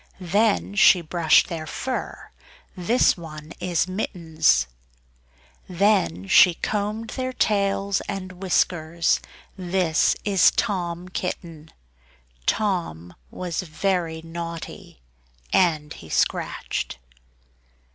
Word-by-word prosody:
Then 200 +3 +1
she 195 -3 +6
brushed 165 -1 +3
their 160 -2 -5
fur, 260 +10 -5 0.4
(this 210 +7 +3
one 155 -2 -10
is 175 -1 0
Mittens). 170 -5 +1 1.0
Then 175 - +1
she 175 - +6
combed 210 +4 -3
their 255 -1 -3
tails 200 -4 0
and 185 -1 -4
whiskers 170 -3 +1 0.4
(this 180 -3 +1
is 195 -3 +5
Tom 180 -4 -2
Kitten). 165 -4 -5 0.8
Tom 170 - -1 0.2
was 175 - -4
very 170 -1 -2
naughty, 165 - -7 0.5
and 155 -5 +2
he 80 - -13
scratched. - - -1
175 Hz, 90 wpm, -24 LUFS, 160-195 Hz, 1.0 s, she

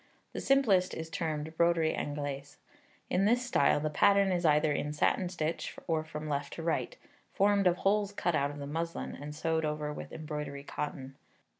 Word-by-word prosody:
The - - -4
simplest 215 -10 +3
is 160 0 -6
termed 160 -4 -3
Broderie 170 -2 +3
Anglaise. 145 -1 -4 0.5
In 190 +2 +3
this 245 +4 +3
style, 145 - +3
the 155 +1 -2
pattern 200 +4 +4
is 175 -1 0
either 150 0 +4
in 145 +1 -1
satin 175 +4 +1
stitch, 165 -2 -3
or 160 -2 0
from 155 -1 -6
left 140 -1 -2
to 165 - -6
right, 170 - -1 0.4
formed 200 -1 +3
of 175 0 +3
holes 200 +1 +1
cut 180 -3 -1
out 140 -2 +1
of 145 - -8
the 140 - -5
muslin, 165 +3 -3
and 150 +1 -7
sewed 160 +1 0
over 150 -1 -2
with - - -8
embroidery 150 -3 -5
cotton. 135 -2 -5
160 Hz, 180 wpm, -31 LUFS, 150-185 Hz, 0.5 s, pattern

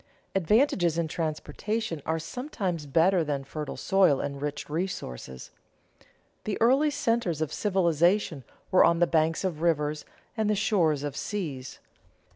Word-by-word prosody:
Advantages 190 - +2
in 170 -1 0
transportation 165 +4 -3
are 160 - +1
sometimes 180 - -4
better 170 +5 +3
than 145 -3 -2
fertile 150 +2 -6
soil 190 -8 +3
and 140 -1 -4
rich 145 0 -4
resources. 145 - -5 0.9
The 210 - -2
early 265 +6 +4
centers 230 - 0
of 155 -2 -2
civilization 175 -4 +1 0.3
were 185 - +6
on 170 - +4
the 175 - +4
banks 165 0 +1
of 170 -5 -2
rivers 150 -3 0 0.3
and 220 -2 0
the 210 - +2
shores 170 -8 +1
of 145 -2 -4
seas. 150 -12 -4
165 Hz, 135 wpm, -27 LUFS, 150-200 Hz, 0.9 s, were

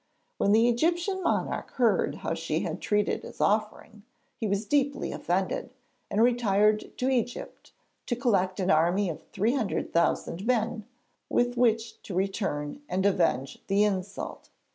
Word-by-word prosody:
When 200 - +3
the 225 +3 +5
Egyptian 345 - +1
monarch - - -1
heard 240 -4 +2
how - - 0
she - - -2
had - - -4
treated 210 -1 +1
his - - -11
offering 215 0 0 0.3
he 225 - -3
was 200 +2 -1
deeply 285 +3 0
offended, - - -2 0.3
and 210 +2 +2
retired 215 -3 +2
to 255 - 0
Egypt 245 -2 -3 0.4
to 240 - 0
collect 200 -7 +1
an 185 -1 +2
army 175 +4 +3
of 155 - -9
three 225 +5 0
hundred 240 -8 -2
thousand 170 +3 0
men, 225 -3 0 0.4
with 245 0 +1
which 230 -2 +1
to 190 - -7
return 190 - -2
and 190 +1 0
avenge 165 -9 +1
the 200 +1 +3
insult. 195 -2 -3
215 Hz, 145 wpm, -28 LUFS, 195-240 Hz, 0.4 s, the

